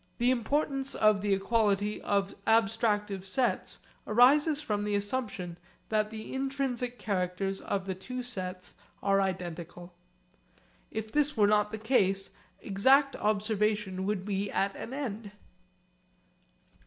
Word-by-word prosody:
The 245 +2 +3
importance 275 +2 0
of 215 -2 +4
the 205 0 0
equality 205 0 +1
of 200 -1 0
abstractive 215 -3 +2
sets 245 +6 0 0.3
arises 285 +7 +5
from 210 -9 -2
the 205 0 0
assumption 200 -5 -3 0.3
that 215 -1 +1
the 220 0 -7
intrinsic 265 -2 -2
characters 195 -1 -2
of 195 -1 -2
the 190 - -2
two 250 +7 -6
sets 185 -6 -6 0.3
are 195 0 +3
identical. 175 -2 -5 1.0
If 220 0 -5
this 295 -1 +1
were 210 - +5
not 210 0 +3
the 220 - -4
case 195 -4 +1 0.3
exact 265 +8 +4
observation 210 -2 0
would 200 -3 -1
be 200 -1 -1
at 195 0 0
an - - -7
end. 225 -7 -5
210 Hz, 125 wpm, -30 LUFS, 195-245 Hz, 1.0 s, arises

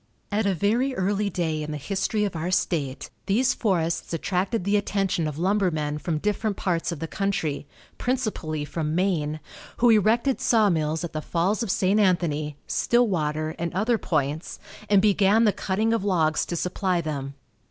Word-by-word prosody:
At 210 0 +1
a 195 - +1
very 235 - +1
early 200 +1 0
day 160 -4 -2
in 150 - -5
the 150 - -3
history 200 - -1
of 195 - -4
our 165 +2 -2
state 155 -7 -1 0.2
these 245 +6 +3
forests 170 -7 -1
attracted 185 +5 -1
the 200 +2 +1
attention 195 -5 0
of 150 -1 -5
lumbermen 170 -5 0
from 155 +1 -2
different 210 +4 -1
parts 175 -2 -1
of 170 - -4
the 165 - -4
country, 165 -7 -2 0.3
principally 210 - -2
from 155 0 -3
Maine, 160 -5 0 0.4
who 240 0 +5
erected 225 +5 +3
sawmills 165 -8 +2
at 170 - -5
the 155 - -3
Falls 180 +8 0
of 230 - -2
St. 190 +3 +2
Anthony, 155 -7 +1
Stillwater 155 -10 +1
and 170 0 -2
other 220 +4 +1
points, 150 -1 -2 0.3
and 200 -1 +5
began 210 +1 +4
the 210 -3 +4
cutting 215 +4 0
of 230 - 0
logs 160 -6 +1
to 175 - -3
supply 180 +1 0
them. 140 -4 -4
185 Hz, 165 wpm, -25 LUFS, 155-205 Hz, 0.4 s, who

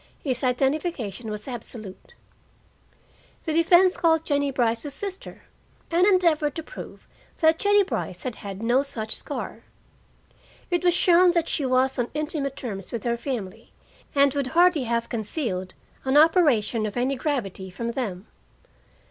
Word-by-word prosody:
His 260 -2 -2
identification 255 - -1
was 210 +2 -6
absolute. 220 -5 -9 1.3
The 315 - -2
defense 350 +3 +5
called 325 -2 +2
Jennie 285 -1 +1
Brice's 250 +2 -1
sister, 390 -2 -7 0.5
and 350 +3 +4
endeavored 330 -7 +3
to 325 - -4
prove - - -10 0.3
that 320 0 +4
Jennie 410 0 +4
Brice 220 - -4
had 250 -3 -4
had 200 0 -7
no 240 +3 +3
such 220 -6 -4
scar. - - -5 1.1
It 350 0 +1
was 350 -1 +4
shown 360 0 +5
that 335 -2 +1
she 285 -4 -1
was 260 +1 +2
on 240 - 0
intimate 300 -3 -2
terms 195 -7 -6
with 235 -3 -4
her 235 -1 0
family 225 -4 -6 0.4
and 280 -1 +5
would 280 -2 -1
hardly 350 -6 +5
have 235 0 -1
concealed 215 - -3 0.3
an 265 +2 +2
operation 280 - +4
of 210 - -6
any 260 +3 +1
gravity 235 - -3
from 230 +6 -4
them. 210 -7 -4
265 Hz, 145 wpm, -25 LUFS, 225-320 Hz, 1.3 s, defense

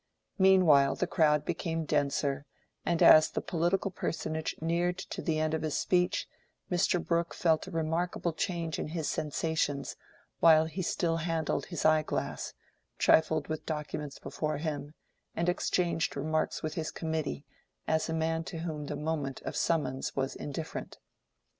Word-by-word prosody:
Meanwhile 170 -8 +6
the - - 0
crowd 150 -4 +2
became 165 -1 -2
denser, 145 -1 0 0.4
and 170 -1 +2
as 155 0 +8
the - - -2
political 175 +4 0
personage 160 -3 -3
neared 175 +3 0
the 160 -2 -1
end 155 0 0
of 160 - 0
his 155 -2 -1
speech, 180 -1 +1 0.4
Mr. 175 0 +2
Brooke 170 0 0
felt 160 -2 +2
a - - -6
remarkable 165 +1 -1
change 165 -2 -2
in - - -2
his 160 -1 -3
sensations 150 -2 -1 0.4
while 160 -1 +7
he 165 +4 -4
still 165 -1 0
handled 165 -1 -1
his 170 -5 -4
eye 155 0 +5
glass, - - -4 0.4
trifled 160 -1 +3
with 155 -1 -5
documents 150 -2 -4
before 150 +2 -3
him, 150 -1 -4 0.4
and 170 - 0
exchanged 175 -1 0
remarks 155 +3 -1
with 155 -1 -2
his 160 -1 -3
committee, 160 - -3 0.4
as 160 +1 +1
a - - -1
man 160 0 0
to 165 -2 -6
whom 155 -3 -4
the - - -3
moment 150 -3 -2
of - - -5
summons 150 -5 0
was 135 0 -1
indifferent. 150 +2 -6
160 Hz, 150 wpm, -30 LUFS, 150-170 Hz, 0.4 s, as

